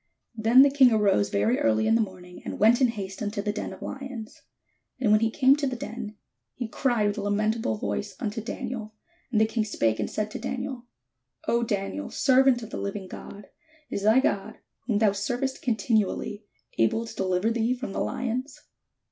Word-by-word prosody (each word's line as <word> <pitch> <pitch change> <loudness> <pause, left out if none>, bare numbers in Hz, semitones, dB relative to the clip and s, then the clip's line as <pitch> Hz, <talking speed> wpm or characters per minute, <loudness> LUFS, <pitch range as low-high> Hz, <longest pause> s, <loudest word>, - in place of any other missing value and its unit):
Then 230 +4 +6
the 280 - +4
king 265 -3 +6
arose 200 - +3
very 105 +5 +1
early 110 -1 +2
in - - +3
the 230 - +4
morning, 180 -3 -7
and - - -5
went 230 +5 +5
in 255 - +6
haste 195 -4 -5
unto 205 0 -3
the 205 +1 0
den 210 - -4
of - - -10
lions. 265 -5 -7 0.6
And 235 -5 +2
when 215 - +6
he 225 0 +2
came 265 +3 +5
to 290 -1 0
the 255 - -2
den, 230 -2 -6 0.4
he 245 - -4
cried 230 -3 +1
with 205 - -3
a - - -2
lamentable 210 - 0
voice 105 - -3
unto 225 -1 -3
Daniel: 225 -2 -5 0.4
and 220 - +2
the 220 - +5
king 220 0 -1
spake 115 - 0
and - - -1
said 215 0 -3
to - - -5
Daniel: 255 0 -4 0.6
"O 235 - +2
Daniel, 195 - -2
servant 260 -2 +4
of 220 - -9
the - - -4
hving 200 -1 -4
God, 200 +2 -10 0.4
is - - -2
thy 220 +5 +5
God, 200 -7 -1 0.3
whom 220 -5 +2
thou 215 -1 +4
servest 245 +7 -2
continually, 215 -2 0 0.3
able 115 - +2
to 225 0 -9
deliver 190 +2 +1
thee 230 +2 +1
from 250 -5 -6
the - - -2
lions? 255 +3 -3
220 Hz, 195 wpm, -26 LUFS, 200-245 Hz, 0.6 s, Then